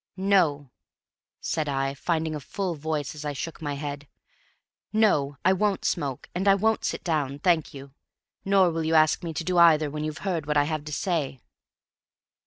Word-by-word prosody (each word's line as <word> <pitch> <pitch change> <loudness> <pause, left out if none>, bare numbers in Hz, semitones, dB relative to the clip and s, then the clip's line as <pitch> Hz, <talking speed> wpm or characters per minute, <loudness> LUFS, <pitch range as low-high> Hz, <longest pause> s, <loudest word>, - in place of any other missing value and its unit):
"No," 170 -9 +2 0.7
said 155 -2 -2
I, 135 0 -1
finding 160 +2 -1
a 150 - -4
full 180 +6 -3
voice 155 -2 -3
as 150 -1 -8
I 145 -1 -3
shook 165 +4 -6
my 145 -2 -3
head; 145 0 -6 0.8
"no, 150 -11 +2
I 185 - +6
won't 200 0 0
smoke, 140 -6 -2
and 190 +3 -2
I 195 - +7
won't 220 +3 +1
sit - - -3
down, 145 -5 -1
thank 160 -1 +1
you. 135 -1 -11 0.5
Nor 195 -2 +4
will 165 0 -2
you 160 +1 +1
ask 155 0 +4
me 170 - -3
to 165 - -2
do 180 0 +1
either 155 -3 +5
when 150 +1 -4
you've 155 +4 -5
heard 170 -6 -2
what 150 0 +1
I 145 - +5
have 155 0 -3
to 155 - -7
say." 150 -5 -2
155 Hz, 190 wpm, -26 LUFS, 145-180 Hz, 0.8 s, I